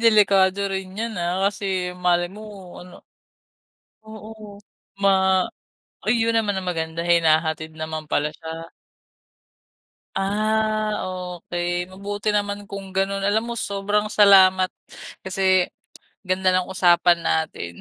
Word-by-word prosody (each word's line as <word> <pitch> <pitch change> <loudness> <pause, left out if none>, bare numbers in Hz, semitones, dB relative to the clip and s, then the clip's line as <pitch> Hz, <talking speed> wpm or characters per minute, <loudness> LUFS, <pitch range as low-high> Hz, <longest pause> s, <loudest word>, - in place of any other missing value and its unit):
delikado 200 -4 +4
rin 190 0 -5
'yan, 230 +1 -3
ah. 175 +1 -1
Kasi 205 0 -8 0.4
malay 175 0 +2
mo, 215 - -9 0.4
ano. 180 0 -13 1.1
Oo, 220 0 -11 0.7
ma 195 - +5 1.0
ayun 230 +1 +2
naman 210 -3 +1
ang 185 -1 -5
maganda, 160 -1 -3
hinahatid 160 -2 +2
naman 155 0 -5
pala 145 - +1
siya. 165 0 -8 1.5
Ah, 215 +2 0 0.4
okey, 175 +1 -3
mabuti 205 +2 -4
naman 205 0 -1
kung 195 -1 -8
ganun. 195 +1 0
Alam 220 +3 0
mo, - - -2
sobrang 205 +1 -1
salamat 190 -3 +5 0.6
kasi 190 -1 +2 0.6
ganda 185 -1 +1
ng 185 0 0
usapan 175 -2 +4
natin. 85 - -2
190 Hz, 110 wpm, -22 LUFS, 175-205 Hz, 1.5 s, ma